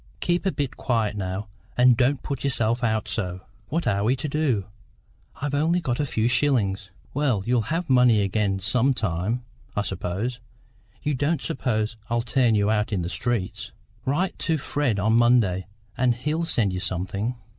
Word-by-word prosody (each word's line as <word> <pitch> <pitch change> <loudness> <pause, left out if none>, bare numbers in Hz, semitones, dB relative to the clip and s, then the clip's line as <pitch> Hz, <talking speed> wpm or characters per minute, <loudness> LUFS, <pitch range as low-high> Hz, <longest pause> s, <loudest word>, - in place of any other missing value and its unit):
Keep 175 +2 0
a - - +2
bit 140 -6 -3
quiet 110 -4 0
now, 95 +1 -3 0.3
and 125 0 +6
don't 130 +2 +1
put 140 -3 -4
yourself 120 -3 +1
out 110 -2 +1
so." 95 -3 -2 0.3
"What 165 +4 -1
are 100 0 +1
we 120 +5 +3
to 145 - -4
do? 135 -9 0 0.7
I've 145 0 -2
only 160 +5 +2
got 130 -8 -2
a 145 - 0
few 110 -2 +1
shillings 115 -6 +1
" - - -30
"Well, 130 -8 +1
you'll 120 -3 +1
have 165 +2 -1
money 125 -5 +5
again 100 0 0
some 125 +8 +2
time, 105 +4 -1 0.3
I 105 - +1
suppose. 100 +6 -3 0.6
You 150 - 0
don't 145 +3 0
suppose 110 -3 -1
I'll 120 0 +1
turn 120 -2 +2
you 105 0 +2
out 105 +1 +1
in 95 -4 0
the 85 - -3
streets? 95 +2 -2 0.3
Write 175 +8 0
to 165 -1 +1
Fred 140 -5 0
on 110 +3 +2
Monday, 115 -6 +3 0.3
and 125 -1 +2
he'll 150 +7 -1
send 105 - +1
you 90 - -2
something." 95 +6 -2
120 Hz, 175 wpm, -25 LUFS, 100-135 Hz, 0.7 s, and